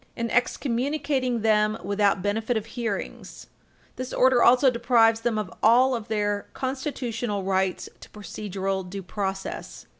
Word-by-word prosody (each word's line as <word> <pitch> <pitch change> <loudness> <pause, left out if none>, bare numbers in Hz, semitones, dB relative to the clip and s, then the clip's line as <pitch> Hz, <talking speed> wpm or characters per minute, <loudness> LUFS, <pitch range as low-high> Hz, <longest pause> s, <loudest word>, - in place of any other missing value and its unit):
In 235 -1 -3
excommunicating 255 0 0
them 215 0 +2
without 200 -1 +1
benefit 220 +3 0
of 220 - -4
hearings, 225 -3 -5 0.5
this 255 0 -5
order 255 -1 +4
also 255 +2 +6
deprives 235 -2 +3
them 230 -1 0
of 210 -3 -4
all 245 +3 +4
their 205 -2 -2
constitutional 245 -6 -3
rights 190 -1 0
to - - -13
procedural 195 -1 -4
due 195 +1 -6
process. 195 0 -5
225 Hz, 125 wpm, -25 LUFS, 205-245 Hz, 0.5 s, also